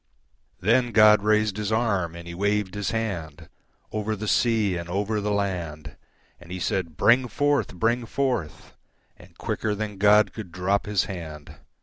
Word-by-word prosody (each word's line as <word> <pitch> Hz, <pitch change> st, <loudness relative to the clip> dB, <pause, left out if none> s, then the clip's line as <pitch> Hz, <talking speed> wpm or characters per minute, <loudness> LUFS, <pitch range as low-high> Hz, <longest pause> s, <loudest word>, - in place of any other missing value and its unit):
Then 120 Hz, +4 st, +2 dB
God 105 Hz, -1 st, +7 dB
raised 105 Hz, -1 st, +2 dB
His 105 Hz, 0 st, -2 dB
arm 100 Hz, -7 st, 0 dB
and 85 Hz, 0 st, -9 dB
He 85 Hz, -, -6 dB
waved 100 Hz, +1 st, 0 dB
His 105 Hz, -1 st, -2 dB
handOver 105 Hz, +1 st, -5 dB
the 110 Hz, +2 st, -5 dB
sea 110 Hz, -5 st, +2 dB
and 85 Hz, 0 st, -5 dB
over 105 Hz, +3 st, -1 dB
the 105 Hz, -, -2 dB
land, 85 Hz, -8 st, -3 dB, 0.4 s
And 85 Hz, 0 st, -14 dB
He 90 Hz, -, -4 dB
said, 85 Hz, -4 st, -2 dB
"Bring 125 Hz, +2 st, +4 dB
forth! 145 Hz, -5 st, 0 dB
Bring 115 Hz, +4 st, 0 dB
forth!"And 90 Hz, -, -5 dB
quicker 110 Hz, -1 st, -2 dB
than 105 Hz, -2 st, -5 dB
God 105 Hz, 0 st, +5 dB
could 105 Hz, -6 st, -8 dB
drop 95 Hz, +4 st, 0 dB
His 105 Hz, -2 st, +1 dB
hand. 80 Hz, -6 st, -8 dB
105 Hz, 150 wpm, -25 LUFS, 90-110 Hz, 0.4 s, God